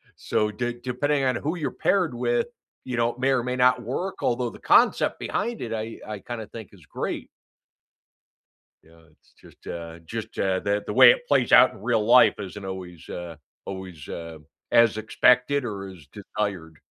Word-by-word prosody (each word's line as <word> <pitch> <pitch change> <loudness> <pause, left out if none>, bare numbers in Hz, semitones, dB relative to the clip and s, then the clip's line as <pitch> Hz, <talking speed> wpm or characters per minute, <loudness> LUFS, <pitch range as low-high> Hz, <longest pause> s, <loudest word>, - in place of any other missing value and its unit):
So, 105 0 -1
d 120 +2 -3
depending 135 +3 0
on 130 -2 +1
who 155 +5 -2
you're 155 - -2
paired 180 -9 +1
with, 120 0 0 0.4
you 125 -2 -4
know, 120 0 +1
may 135 +1 +1
or 125 -3 +1
may 125 0 -2
not 125 0 +3
work, 155 - -4
although 120 -1 0
the - - -13
concept - - +3
behind 235 -1 -2
it, 115 -1 -4
I 110 +1 -5
I 105 -2 -5
kinda 115 -1 -6
think 110 -3 -10
is 85 -6 -18
great. - - -4 1.6
Yeah, 80 +1 -21
it's - - -30
just, - - -19
uh 85 -1 -7
just, 110 +6 -7
uh, 95 -1 +1
the 100 +1 -1
the - - -3
way - - +9
it - - 0
plays - - +2
out - - +8
in - - -14
real 105 - +1
life 125 +3 +6
isn't 100 0 -7
always, 90 -3 -8
uh 85 -2 -7 0.3
always, 95 -6 -8
uh, 85 -1 -7 0.3
as 115 -2 +5
expected 125 +5 +3
or 100 -4 -5
as 85 -7 -13
desired. 95 -6 -5
110 Hz, 180 wpm, -25 LUFS, 95-125 Hz, 1.6 s, way